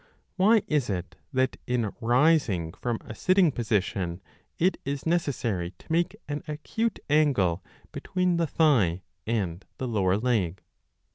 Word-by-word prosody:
Why 210 +3 +4
is 145 -6 0
it 90 -2 -3 0.2
that 130 -1 +1
in 120 -4 0
rising 120 - +3
from 120 -2 -2
a - - -9
sitting 185 - +3
position 100 -7 -1 0.4
it 185 +3 +2
is 140 0 -4
necessary 120 - -1
to - - -14
make 170 +2 +1
an 145 0 -3
acute 195 +9 -2
angle 130 - +2 0.3
between 180 -2 0
the 170 -1 +1
thigh 110 - +3 0.2
and 95 -6 -1
the 130 - -3
lower 100 -5 +2
leg 105 -7 0
125 Hz, 135 wpm, -27 LUFS, 95-160 Hz, 0.4 s, Why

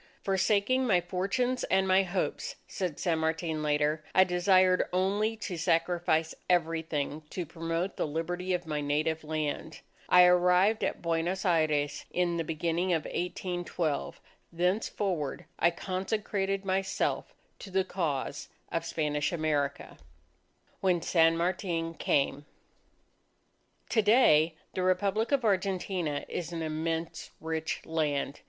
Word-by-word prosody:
"Forsaking 205 +6 +2
my 190 -6 +4
fortunes 200 +9 -1
and 190 0 +2
my 190 +1 +5
hopes," 185 0 -2
said 180 -6 -3
San 165 -3 +1
Martin 160 0 -1
later, 150 +1 +1
"I 185 - +8
desired 185 0 +3
only 200 +5 +1
to 200 -5 -5
sacrifice 165 -1 +1 0.2
everything 160 -4 0
to 180 - -4
promote 165 +3 -3
the - - 0
Liberty 175 +4 -3
of 175 0 -5
my 150 -2 -2
native 155 +2 0
land. 155 0 -3 0.3
I 180 0 +8
arrived 180 +4 +4
at - - -2
Buenos 170 +3 -1
Aires 155 -4 +1
in 175 -1 0
the 165 - 0
beginning 165 +3 -1
of 160 -3 0
1812 175 -3 -3 0.3
thenceforward 180 -3 -1
I 170 - +5
consecrated 195 +2 -2
myself 190 0 -1 0.2
to 200 - -9
the 190 0 +1
cause 155 -6 -3 0.2
of 165 - -1
Spanish 150 -2 -1
America." 150 -4 -1 0.8
WHEN 180 -3 +1
SAN 165 -1 +4
MARTIN 170 -1 -1
CAME 145 -2 0 1.4
To 220 - +3
day, 170 -8 +5 0.2
the 185 - -2
Republic 195 +5 +1
of 275 -4 +2
Argentina 185 -6 0
is 170 -1 -4
an 165 -1 -3
immense 160 +1 -3
rich 160 0 -3
land. 150 -3 -1
175 Hz, 125 wpm, -29 LUFS, 160-190 Hz, 1.4 s, I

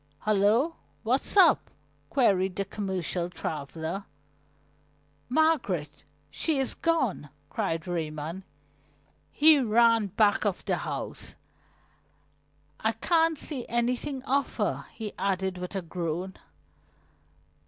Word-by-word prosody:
"Hullo! 215 +10 +2 0.3
What's 255 - 0
up?" 380 - +6 0.4
queried 195 - +2
the 200 - -1
commercial 185 -4 -2
traveler. 160 +3 -4 1.2
"Margaret! 250 - +1 0.3
She 315 -3 0
is 270 -1 -1
gone!" 265 - 0 0.2
cried 185 -6 -2
Raymond. 160 0 -3 0.9
He 305 0 +6
ran 230 -2 +4
back 205 +2 +2
of 205 -4 -1
the - - +1
house. - - -5 1.4
"I - - +1
can't 330 -2 +2
see 275 -5 -4
anything 250 +3 -1
of 275 +1 0
her!" - - -1
he 220 -3 -5
added 190 -1 -1
with 180 +2 -6
a 190 - -2
groan. 175 +2 -3
205 Hz, 100 wpm, -28 LUFS, 180-260 Hz, 1.4 s, up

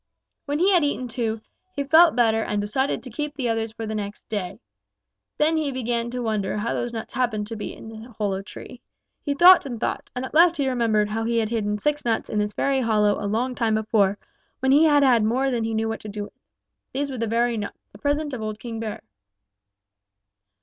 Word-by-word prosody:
"When 290 +1 0
he 370 +5 +3
had 355 -4 +4
eaten 285 -3 -1
two, 225 -2 -3 0.3
he 285 - -1
felt 320 +3 +6
better 225 -2 +3
and 210 -1 -1
decided 235 +7 -1
to 255 - -8
keep 295 +4 -4
the 260 -3 -2
others 225 -1 -1
for 225 0 -6
the 220 - -4
next 205 -1 -6
day. 200 -1 -4 0.8
Then 315 +2 +3
he 300 -3 -1
began 235 -2 -2
to 250 0 -4
wonder 210 -3 -1
how 225 +3 -1
those 240 - -2
nuts 225 -1 -6
happened 235 -4 0
to 225 +2 -6
be 210 - -6
in - - -11
that 225 +1 -11
hollow 195 -2 -1
tree. 245 +5 -11 0.4
He 285 -2 -2
thought 360 +5 +8
and 240 -4 -5
thought, - - -3
and 250 +1 -3
at - - -9
last 340 +2 +5
he 280 -2 0
remembered 225 -5 +1
how 225 +1 -2
he 235 0 0
had 220 -2 +1
hidden 210 -2 -1
six 295 +6 -1
nuts 230 -2 -1
in 215 - 0
this 210 0 -1
very 275 -1 +1
hollow 210 -3 +2
a - - -1
long 245 +5 0
time 230 -3 0
before, 210 -2 +2 0.4
when 265 0 +2
he 295 +4 +6
had 290 -2 +5
had 245 -5 +4
more 260 +5 +1
than 235 -2 -1
he 225 0 -2
knew 220 0 0
what 225 - -3
to 215 - -9
do 205 0 -5
with. - - -11 0.6
These 280 +1 -2
were 255 - -5
the 230 - -1
very 235 +2 +1
nuts, 210 -2 -5
the - - -15
present 290 0 -1
of 245 - -4
old 215 -1 -4
King 225 0 -6
Bear. 220 -2 -5
230 Hz, 230 wpm, -24 LUFS, 215-270 Hz, 0.8 s, thought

